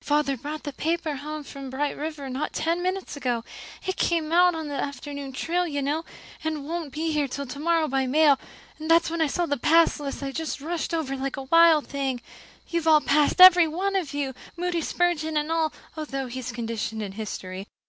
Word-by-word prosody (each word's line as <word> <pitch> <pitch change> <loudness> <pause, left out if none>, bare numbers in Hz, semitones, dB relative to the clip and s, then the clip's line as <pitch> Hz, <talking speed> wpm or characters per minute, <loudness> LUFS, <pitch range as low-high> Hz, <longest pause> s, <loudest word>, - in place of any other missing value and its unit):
"Father 290 -2 +1
brought 295 +5 -6
the 290 - -5
paper 320 -1 -1
home 305 +2 -6
from 275 -1 -8
Bright 285 +3 -2
River 300 -2 -5
not 265 +3 -3
ten 335 +2 0
minutes 370 -2 -2
ago 245 -5 -1 0.4
it 375 - -2
came 325 -2 0
out 355 0 +5
on 320 -1 -4
the 290 - -5
afternoon 280 0 -5
train, 340 +5 -1
you 285 - -1
know, 300 +4 -1 0.4
and 310 -3 -3
won't 330 -3 -4
be 320 +4 -2
here 300 -2 +1
till 280 +2 -5
tomorrow 310 +5 0
by 265 -1 0
mail 290 0 +5 0.4
and 315 +1 -2
when 335 0 +3
I 320 - +4
saw 345 +4 0
the 290 -3 -1
pass 325 +5 +4
list 280 -1 -5
I 275 - -3
just 320 +2 -3
rushed 330 +5 -3
over 285 -4 -2
like 270 0 -3
a 270 - -4
wild 330 +1 +5
thing. 270 -3 -2 0.5
You've 335 -1 -2
all 310 -1 +7
passed, 295 +4 +2
every 360 -2 +10
one 380 +5 -1
of 355 -7 -1
you, 280 -2 -2 0.2
Moody 350 -1 -1
Spurgeon 315 -2 0
and 300 +2 -1
all, 325 -1 +1 0.2
although 275 -4 -4
he's 250 0 -5
conditioned 225 -2 -3
in 200 - -5
history. 195 -2 -6
300 Hz, 200 wpm, -25 LUFS, 275-330 Hz, 0.5 s, every